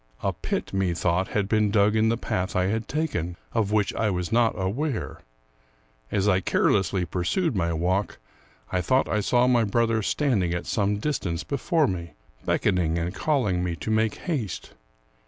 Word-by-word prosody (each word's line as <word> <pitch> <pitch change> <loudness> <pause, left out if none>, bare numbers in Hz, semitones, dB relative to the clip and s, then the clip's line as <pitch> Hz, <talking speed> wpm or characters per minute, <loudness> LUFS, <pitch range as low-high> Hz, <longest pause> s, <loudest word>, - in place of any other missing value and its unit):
A - - +1
pit, - - -4
methought, 90 -1 +1
had 100 -2 -1
been 110 -1 +2
dug 105 +1 +3
in 110 0 +3
the 115 - +1
path 95 -4 -2
I 90 0 +2
had 110 +3 -1
taken, 90 - -2 0.2
of 110 -3 +1
which 105 -2 +1
I 110 - 0
was 90 0 -2
not 115 0 +3
aware. 115 +8 -2 0.9
As 100 +1 +1
I 95 -2 +4
carelessly 95 -1 +1
pursued 100 - -1
my 85 -3 0
walk, 90 +5 0 0.5
I 90 - +1
thought 130 +7 +2
I 105 - 0
saw 120 +4 +3
my 125 -2 +4
brother 115 +1 +1
standing 100 - +1
at 85 - -4
some 105 -1 0
distance 95 - -2
before 145 - +1
me, 85 -7 -4 0.3
beckoning 85 -3 +1
and 85 +2 -2
calling 105 - 0
me 85 -2 -2
to 110 - -4
make 110 -1 +2
haste. 130 - -4
100 Hz, 170 wpm, -25 LUFS, 90-115 Hz, 0.9 s, I